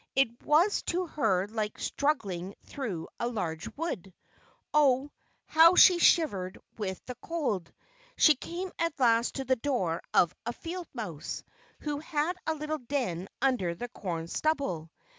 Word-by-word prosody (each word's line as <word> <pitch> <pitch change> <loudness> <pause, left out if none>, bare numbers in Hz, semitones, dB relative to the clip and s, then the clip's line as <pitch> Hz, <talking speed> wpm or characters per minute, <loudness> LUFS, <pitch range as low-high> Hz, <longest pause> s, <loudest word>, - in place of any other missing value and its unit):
It 240 -3 +2
was 335 +8 +3
to 360 +1 0
her 220 - +1
like 215 -1 -3
struggling 200 - -1
through 205 - -5
a 235 - 0
large 175 -9 -3
wood. 245 - -3 0.6
Oh! 285 -1 +4 0.3
how 330 +3 +7
she 360 -1 +8
shivered 195 - +3 0.2
with 190 -4 -3
the 250 - -5
cold. 260 - -2 0.5
She 310 - +7
came 350 +6 -6
at 335 -3 -1
last 235 -2 +3
to 270 - -3
the 260 0 +2
door 225 - -1
of 175 0 +4
a 235 - -3
field 345 +4 -6
mouse, 180 - -5 0.4
who 295 -1 -2
had 315 +2 -1
a 315 - +1
little 305 0 -3
den 235 -9 -2 0.2
under 225 -11 +1
the 245 +7 -6
corn 170 -7 -4
stubble. 185 - -1
255 Hz, 145 wpm, -29 LUFS, 190-310 Hz, 0.6 s, she